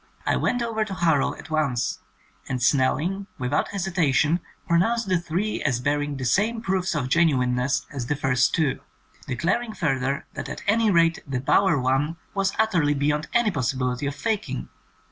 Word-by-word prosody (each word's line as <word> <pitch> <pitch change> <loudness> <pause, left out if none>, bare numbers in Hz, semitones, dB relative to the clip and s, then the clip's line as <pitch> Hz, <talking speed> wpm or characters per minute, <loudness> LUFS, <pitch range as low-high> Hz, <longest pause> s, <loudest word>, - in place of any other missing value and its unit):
I - - +2
went 245 -1 0
over 225 -2 -1
to 200 -3 -5
Harrow 165 -5 +2
at 160 - -12
once, 125 - 0 0.5
and 130 -2 -1
Snell 130 +1 +3
ing 195 +5 -3
without 125 +3 0
hesitation 175 -5 +1 0.3
pronounced 210 +7 +2
the 185 -2 +2
three 175 +6 -2
as 130 -5 0
bearing 145 +1 -1
the 130 - -4
same 215 - +2
proofs 190 -5 -1
of 140 -4 -1
genuineness 130 -4 +2
as 130 -4 -4
the 145 - 0
first 130 -2 +2
two, 155 -5 +1 0.5
declaring 185 - -1
further 135 -3 -1
that - - -6
at - - -7
any 220 +2 +3
rate 165 -3 +3
the 135 -2 -2
"bower" 160 +4 +3
one 135 +6 0 0.2
was 195 -1 0
utterly 175 -10 +2
beyond 150 +2 0
any 235 -3 +3
possibility 130 -2 -1
of 140 - -3
faking! 145 - -3
150 Hz, 165 wpm, -24 LUFS, 130-190 Hz, 0.5 s, Snell